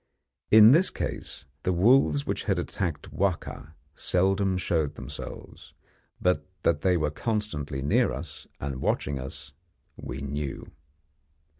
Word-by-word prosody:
In 110 +1 +9
this 170 +7 +5
case, - - -5 0.2
the 90 - 0
wolves 90 - +4
which - - -3
had - - +1
attacked 85 -6 -3
Wahka 85 -5 -2 0.2
seldom 95 +1 +1
showed 80 -5 0
themselves, - - -9 0.5
but 90 0 +1 0.2
that 80 -3 +2
they 90 -2 +3
were 75 -2 0
constantly 75 - -3
near 70 - +3
us, 70 +3 -7
and 65 -2 -4
watching 70 -2 0
us, 65 +2 -8 0.4
we 60 - -6
knew. 70 0 -4
80 Hz, 125 wpm, -27 LUFS, 70-95 Hz, 0.5 s, In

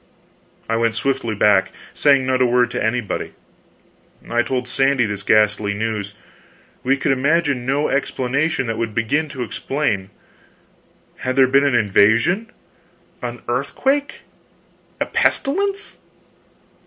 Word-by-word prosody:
I 115 - 0
went 115 -1 +1
swiftly 120 -5 -1
back, 100 -1 +3 0.2
saying 140 -3 +3
not 130 0 +1
a - - +5
word 125 0 +2
to 125 - -2
anybody. 110 -1 -2 0.9
I 120 0 +1
told 125 0 -2
Sandy 135 -1 +2
this 105 -1 -4
ghastly 105 -1 +2
news. 105 -2 -3 0.7
We 135 +2 +1
could 140 +1 0
imagine 140 -1 +1
no 140 +3 +1
explanation 140 +2 -1
that 115 -1 -3
would 115 -2 -3
begin 145 +7 0
to 130 -3 -5
explain. 115 -6 -2 1.1
Had 130 0 -3
there 135 -1 +6
been 135 +2 +3
an 140 -3 +2
invasion? 115 - +3 0.7
an - - -6
earthquake? 280 +1 -1 0.8
a - - +1
pestilence? 395 +7 0
125 Hz, 125 wpm, -20 LUFS, 110-140 Hz, 1.1 s, there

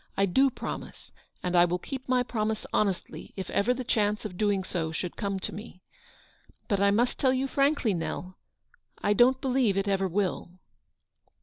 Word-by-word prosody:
" - - -36
I 195 - +4
do 265 +9 +4
promise, - - -7 0.3
and 180 0 -1
I 175 0 +7
will 175 +1 0
keep 260 +8 -7
my 250 -1 +3
promise 220 -3 -2
honestly 195 -4 -1
if 190 -2 -5
ever 210 +5 +2
the 250 +1 -1
chance 210 -2 0
of 190 -4 -5
doing 205 -1 +1
so 165 -3 -2
should 170 +2 -4
come 200 -2 -2
to - - -4
me. 205 -3 -10 0.8
But 200 -4 +1
I 200 0 +4
must 235 +5 +1
tell 260 -2 +3
you 260 +1 0
frankly, 275 -5 +2
Nell, 180 +2 -4 0.7
I 205 - +3
don't 250 +5 +5
believe 255 -7 +1
it 195 +1 0
ever 195 -1 +1
will." 185 -1 -2
205 Hz, 185 wpm, -28 LUFS, 190-250 Hz, 0.8 s, I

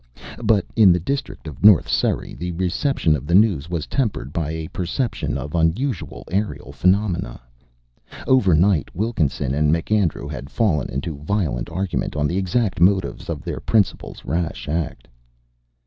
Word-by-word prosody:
But 110 -4 +2
in 105 -5 +7
the 90 - +3
district 135 - -4
of 75 +1 -9
North 100 -6 +7
Surrey - - 0
the 90 +1 -5
reception 90 - +1
of 70 0 -6
the 85 - +2
news 95 -8 +3
was 85 -4 -2
tempered 100 - -2
by 80 -3 -2
a 80 0 -4
perception 95 +8 -2
of 75 - -6
unusual 85 - -1
aerial 100 - -2
phenomena. 90 - 0 0.9
Overnight 95 - +3
Wilkinson 80 - -1
and 75 +1 +2
MacAndrew 85 -2 0
had 70 -2 -7
fallen 80 - 0
into 70 +3 -4
violent 75 - -2
argument 90 +2 -2
on 75 -1 0
the 85 +5 0
exact 95 0 0
motives 95 -1 +2
of 75 -6 -4
their - - -4
principal's 110 -4 -1
rash 85 -3 -2
act. 75 -5 -3
85 Hz, 150 wpm, -21 LUFS, 75-100 Hz, 0.9 s, in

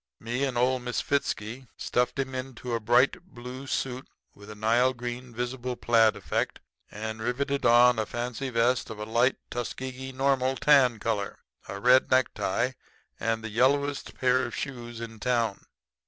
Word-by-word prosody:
Me 120 +4 -2
and 130 -3 -2
old 125 +1 +2
Misfitzky 125 -1 -2
stuffed 125 +2 0
him 135 -1 -2
into 130 -1 -5
a 115 - +1
bright 120 +9 +3
blue 130 -5 -9
suit 130 -1 -3 0.3
with 100 +1 -14
a 105 - -8
Nile 120 +4 +2
green 120 +1 -6
visible 125 +1 -3
plaid 115 -2 +4
effect, 100 - -2 0.3
and 110 +1 -5
riveted 135 +3 0
on 120 0 +6
a 110 - 0
fancy 125 +3 -3
vest 120 +1 +1
of 110 - -7
a 105 - -5
light 120 +4 +2 0.2
Tuskegee 130 +2 -5
Normal 135 0 +1
tan 130 -4 +5
color, 105 -2 -2 0.3
a 100 - -5
red 125 +4 +5
necktie, 120 -1 +1 0.5
and 115 0 -1
the 110 - -4
yellowest 140 +5 +1
pair 130 0 +2
of 120 - -4
shoes 120 -4 -6
in 115 -1 -8
town. 115 -4 0
125 Hz, 155 wpm, -27 LUFS, 115-130 Hz, 0.5 s, on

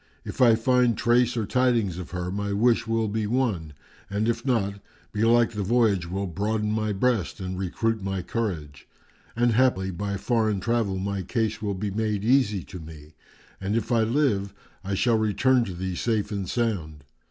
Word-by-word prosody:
If - - -5
I 120 -3 +7
find 120 -1 +2
trace 120 0 +2
or 110 - 0
tidings 115 -7 +1
of 90 - -7
her, 90 0 -4
my 100 +1 -2
wish 115 +2 +2
will 115 -1 +1
be 105 0 -2
won, 105 - -1 0.4
and 100 +2 -1
if 115 0 -1
not, 100 -7 0 0.3
belike 115 +2 +3
the 105 -2 -4
voyage 100 -5 +2
will 95 +2 -2
broaden 105 +4 -1
my 110 0 0
breast 105 -2 0
and 95 -1 -4
recruit 110 +4 -1
my 95 -1 -3
courage; 80 - -4 0.5
and 120 +1 +3
haply 110 -6 +2
by 100 +2 -3
foreign 110 -2 +1
travel 115 -3 0
my 100 +1 -2
case 110 +2 -2
will 100 -2 -2
be 100 +2 -3
made 105 -1 -1
easy 110 -6 +2
to 90 - -9
me, 80 -1 -12 0.5
and 100 +3 -1
if 115 +1 -1
I 115 -1 +4
live, 110 -5 +1 0.3
I 100 0 -2
shall 115 +2 +2
return 120 +4 +2
to 95 - -6
thee 95 +1 -3
safe 110 +4 -1
and 100 -3 -3
sound." 85 - -2
105 Hz, 180 wpm, -25 LUFS, 95-115 Hz, 0.5 s, I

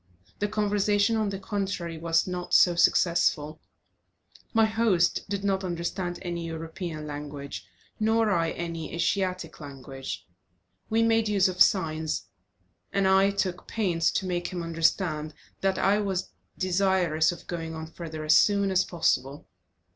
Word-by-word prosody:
The 205 - +1
conversation, 205 0 +1
on 215 -2 0
the 195 - -4
contrary, 190 -4 -3
was 165 0 +2
not 180 -1 -2
so 175 - +6
successful; 160 -3 +2 0.9
my 225 -1 +4
host 215 -6 +2
did 200 -1 -2
not 195 -1 0
understand 175 0 -3
any 170 -1 -4
European 165 -1 -6
language, 145 -1 -7 0.3
nor 220 0 +2
I 165 -3 +2
any 165 -1 -5
Asiatic 185 +1 -1
language. 135 -2 -7 0.6
We 225 +1 +3
made 225 -1 +2
use 195 -2 +4
of 185 -1 -4
signs, 160 -4 +2 0.7
and 195 -1 +2
I 190 +1 +5
took 190 -3 -2
pains 175 -7 +1
to 190 - -1
make 175 -1 -2
him 175 -2 -4
understand 165 -2 0 0.2
that 195 -1 +1
I 200 +2 +3
was 195 -3 -2 0.3
desirous 185 -4 +2
of 175 - -10
going 165 -2 -5
on 160 0 -5
further 160 -1 -7
as 155 +1 +5
soon 200 +2 +4
as 185 0 +3
possible. 140 -5 -1
180 Hz, 140 wpm, -27 LUFS, 160-200 Hz, 0.9 s, so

